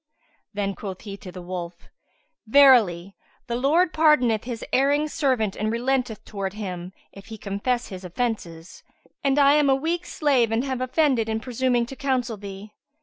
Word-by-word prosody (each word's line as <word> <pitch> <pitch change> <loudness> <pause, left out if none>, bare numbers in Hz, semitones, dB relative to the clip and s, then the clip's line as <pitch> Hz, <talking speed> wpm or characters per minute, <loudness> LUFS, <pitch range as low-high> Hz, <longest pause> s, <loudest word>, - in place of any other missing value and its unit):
Then 200 -1 -2
quoth 190 -2 -7
he 200 -3 -7
to 185 - -10
the 180 0 -9
wolf, 175 -1 -5 0.7
"Verily, 215 -9 +5 0.3
the 235 -2 -3
Lord 315 +8 +2
pardoneth 255 -9 +3
his 240 -2 -5
erring 285 +3 +3
servant 260 -10 0
and 215 +1 -2
relenteth 245 -1 -1
towards 195 -2 -5
him, 185 -4 -6 0.2
if 195 0 -14
he 220 -1 -8
confess 215 +5 -2
his 190 -2 -8
offences; 180 -4 -4 0.4
and 275 0 +2
I 280 0 +6
am 295 -1 +3
a 270 - +5
weak 335 +5 -2
slave 265 -7 +1
and 225 +2 +1
have 260 -2 -3
offended 255 -4 +1
in 220 0 -1
presuming 245 0 0
to 270 - -9
counsel 260 -4 -1
thee. 200 +1 -9
235 Hz, 165 wpm, -24 LUFS, 200-270 Hz, 0.7 s, I